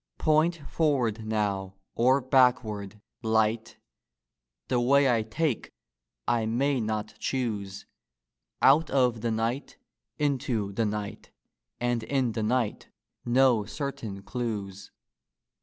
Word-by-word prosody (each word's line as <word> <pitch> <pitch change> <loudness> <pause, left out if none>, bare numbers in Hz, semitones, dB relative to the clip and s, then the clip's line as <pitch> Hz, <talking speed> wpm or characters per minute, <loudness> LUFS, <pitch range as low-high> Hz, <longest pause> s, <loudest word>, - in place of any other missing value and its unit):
Point 155 +2 +3
forward 120 -9 0
now 100 -3 -1 0.2
or 130 +4 +3
backward, 120 -6 +2 0.2
Light! 110 0 0 0.9
The 125 - +1
way 140 +3 +4
I 120 -3 +3
take 120 +5 -2 0.6
I 115 -2 +1
may 135 +4 +1
not 110 -1 -3
choose: 105 -7 -3 0.8
Out 150 +4 +6
of 125 -4 +2
the 120 - 0
night 115 +5 -2 0.4
into 125 -8 -1
the 110 +2 0
night, 105 +1 -5 0.5
And 120 -1 0
in 130 +1 0
the 110 - -3
night 115 0 -1 0.4
no 120 -2 +4
certain 110 -9 -5
clews. 100 -5 -4
115 Hz, 110 wpm, -27 LUFS, 110-130 Hz, 0.9 s, Out